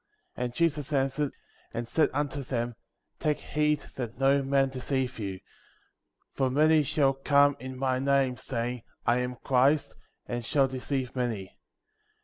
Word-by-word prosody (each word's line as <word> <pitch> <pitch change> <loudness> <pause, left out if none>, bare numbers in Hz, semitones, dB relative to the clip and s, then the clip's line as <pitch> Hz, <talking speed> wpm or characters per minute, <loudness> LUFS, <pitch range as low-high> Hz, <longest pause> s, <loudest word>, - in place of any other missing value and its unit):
5. - - -3
And 120 - -4
Jesus 155 -4 0
answered, 135 +1 +1 0.4
and 115 0 -3
said 155 +4 +3
unto 145 0 -2
them: 120 -2 -2 0.5
Take 150 -1 +1
heed 150 0 0 0.2
that 120 -3 -4
no 135 +1 +4
man 135 0 +2
deceive 130 -1 -2
you; 100 -3 -3
6. 95 - -15 0.9
For 135 -1 +1
many 155 +4 +4
shall 140 -1 +2
come 140 +1 +4
in 130 +1 -7
my 130 -1 0
name, 135 -1 +2
saying 120 0 -3 0.2
— - - -42
I 120 +1 +3
am 125 0 -2
Christ 135 +3 +3 0.2
— - - -50
and 120 0 -3
shall 135 +3 +3
deceive 130 0 -3
many; 115 -7 -2
7. - - -33
135 Hz, 165 wpm, -28 LUFS, 125-140 Hz, 0.9 s, no